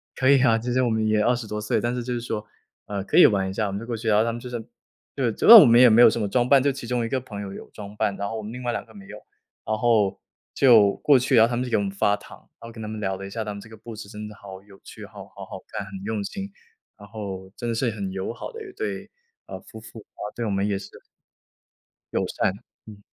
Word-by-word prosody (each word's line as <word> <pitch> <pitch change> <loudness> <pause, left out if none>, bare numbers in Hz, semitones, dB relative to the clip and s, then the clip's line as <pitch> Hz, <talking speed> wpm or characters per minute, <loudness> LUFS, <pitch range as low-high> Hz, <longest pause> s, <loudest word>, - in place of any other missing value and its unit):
“可 130 - 0
以 135 -1 +6
啊。” 115 -3 +4
其 120 +2 -3
实 130 - +2
我 125 - +1
们 110 -1 0
也 110 0 +2
20 120 +1 +1
多 105 0 -4
岁， 105 - 0
但 120 +1 -1
是 125 - -3
就 125 0 -3
是 - - -2
说， 110 -3 -4 0.4
呃， 100 -2 -4
可 - - -4
以 - - +9
玩 95 -2 0
一 95 - -5
下， 105 +1 -1
我 - - -4
们 100 - -4
就 115 - -8
过 120 - -4
去。 115 +1 -6
然 105 -1 +4
后 110 - +4
他 115 - -1
们 120 - -6
就 125 - -8
是 120 -2 -6 0.5
对， 125 -5 0
主 - - -2
要 230 - +13
我 160 - +8
们 120 -1 +6
也 125 - +8
没 115 +1 +6
有 120 - +9
什 115 - -2
么 105 - -1
装 120 +4 0
扮， 140 -2 +5
就 140 - +2
其 130 -3 -8
中 120 -1 -1
一 - - -4
个 130 - -1
朋 105 -5 -8
友 95 -1 -7
有 - - -10
装 105 0 -10
扮。 100 -1 -1
然 100 - -3
后 115 - -5
我 - - -5
们 105 - -8
另 125 +1 -8
外 120 - -1
两 - - -4
个 - - -18
没 100 -1 -12
有， - - -10 0.5
然 110 - -1
后 110 -4 +2 0.4
就 110 -7 +6
过 140 -3 +4
去， 130 +1 +1
然 115 - +7
后 115 - -3
他 120 - -2
们 125 - -1
就 125 - -5
给 - - +3
我 100 - 0
们 95 - -3
发 100 +1 +1
糖， - - -14 0.2
然 115 - -9
后 - - -10
跟 110 -1 -10
他 105 - -6
们 110 0 -6
聊 95 -2 -2
了 95 - -8
一 - - -9
下， 110 +2 -4
他 105 - -5
们 100 - -9
这 110 - -14
个 110 - -13
故 115 +2 -10
事 105 -1 -10
真 105 -1 -8
的 105 - -10
好 95 -2 -12
有 100 -1 -18
趣， - - -11
好 - - -12
好 - - -11
好 - - -9
看， 100 - -5
很 100 - -13
用 110 -2 -2
心。 195 - -6 0.5
然 100 - -13
后 100 -3 -7
真 120 - -5
的 115 - -1
是 115 0 0
很 100 -3 -5
友 95 +3 -4
好 - - -8
的 455 -1 -9
一 380 - -12
对， 425 +2 -5 0.4
呃， - - -7
夫 110 - -12
妇。 110 0 -12
啊， - - -17
对 120 - -4
我 105 - -2
们 100 +1 0
也 100 - -1
是 - - -11 1.2
友 - - 0
善， - - 0 0.4
嗯。 105 -1 -12
110 Hz, 335 characters per minute, -24 LUFS, 100-120 Hz, 1.2 s, 要